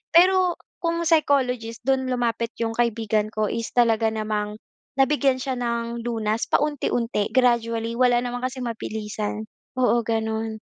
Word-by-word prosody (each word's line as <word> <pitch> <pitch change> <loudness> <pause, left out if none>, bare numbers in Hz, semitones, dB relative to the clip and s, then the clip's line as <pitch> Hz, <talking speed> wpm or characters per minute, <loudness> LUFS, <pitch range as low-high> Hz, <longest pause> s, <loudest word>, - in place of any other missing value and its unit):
Pero 365 0 +5 0.2
kung 335 0 -1
psychologist 255 -8 +1
don 265 0 +1
lumapit 235 -2 -1
'yong 225 - -1
kaibigan 225 -3 +1
ko 215 -1 0
is 230 -1 -3
talaga 230 -2 +4
namang 210 -1 -2 0.4
nabigyan 275 -1 +3
siya 260 -1 -2
ng 235 -1 -2
lunas 225 -1 -1
paunti-unti, 245 -7 0
gradually. 230 -2 +2
Wala 245 -1 +4
naman 245 0 -3
kasing 255 0 -4
mabilisan. 215 -2 -4 0.3
Oo 245 -2 +3
gano'n. 220 0 -2
235 Hz, 130 wpm, -24 LUFS, 220-255 Hz, 0.4 s, Pero